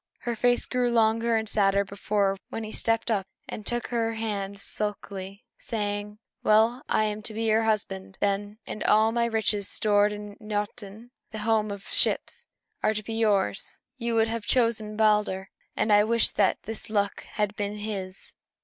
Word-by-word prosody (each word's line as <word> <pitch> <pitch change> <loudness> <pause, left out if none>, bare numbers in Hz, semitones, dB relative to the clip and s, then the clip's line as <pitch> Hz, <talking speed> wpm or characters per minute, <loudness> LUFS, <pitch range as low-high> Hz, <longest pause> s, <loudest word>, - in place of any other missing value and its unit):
Her 240 -1 -2
face 245 +2 +2
grew 250 -1 +1
longer 230 0 +3
and 220 0 0
sadder 200 -2 +3
than - - -3
before 200 -1 +1
when 225 - -4
he 215 - -6
stepped 225 +1 0
up 195 -3 0 0.2
and 210 - -7
took 240 0 -1
her 230 -1 0
hand 200 -3 -3
sulkily, 200 0 -4
saying, 205 -1 -3 0.3
"Well, 220 +4 +4
I - - +3
am 210 0 -2
to 215 0 -4
be 225 - -1
your 220 0 +3
husband, 195 -3 -1
then, 205 +1 -1
and 215 - -5
all 220 +1 +5
my 235 0 +1
riches 220 -3 0
stored 205 -1 +3
in 210 0 -7
Noatûn, 210 +1 -5 0.2
the 220 - -7
home 220 -2 +2
of 200 -1 -6
ships, - - 0 0.3
are 215 - +2
to 215 - -2
be 225 - -5
yours. 205 - +1 0.2
You 235 -2 -1
would 225 0 +4
have 225 -2 -4
chosen 225 -4 +1
Balder, 210 -3 +2 0.2
and 215 - +2
I 205 0 +7
wish 230 +1 +2
that - - +2
this 225 +1 -7
luck 205 -2 0
had 210 -2 0
been 205 0 -3
his! 195 -3 -5
215 Hz, 175 wpm, -27 LUFS, 205-225 Hz, 0.3 s, I